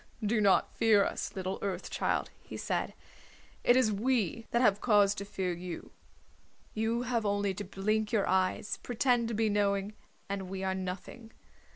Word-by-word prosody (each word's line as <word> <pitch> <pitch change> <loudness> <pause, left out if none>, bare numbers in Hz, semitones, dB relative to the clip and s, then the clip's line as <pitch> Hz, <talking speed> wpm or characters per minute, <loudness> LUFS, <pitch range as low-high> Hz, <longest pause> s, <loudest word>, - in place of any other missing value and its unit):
"Do 215 +1 +2
not 200 -2 +3
fear 215 -3 +4
us, - - -4
little 190 0 -3
Earth 195 -2 -3
Child," - - -1
he - - -8
said. - - -2 0.7
"It 245 - +5
is 240 -4 +3
we 230 0 0
that 235 - +1
have 205 -3 +4
cause 205 -4 +4
to 200 0 -6
fear 190 -3 -2
you. 175 -1 -7 0.8
You 225 +2 0
have 235 -2 0
only 205 -1 0
to 205 +2 -5
blink 210 +3 -1
your 215 -4 +2
eyes, 185 +2 +1
pretend 245 -1 +1
to 230 - -3
be 220 +1 +2
knowing, 200 0 +1 0.3
and 195 -2 -4
we 190 0 -4
are 190 0 0
nothing. 190 +5 -6
205 Hz, 170 wpm, -31 LUFS, 195-225 Hz, 0.8 s, It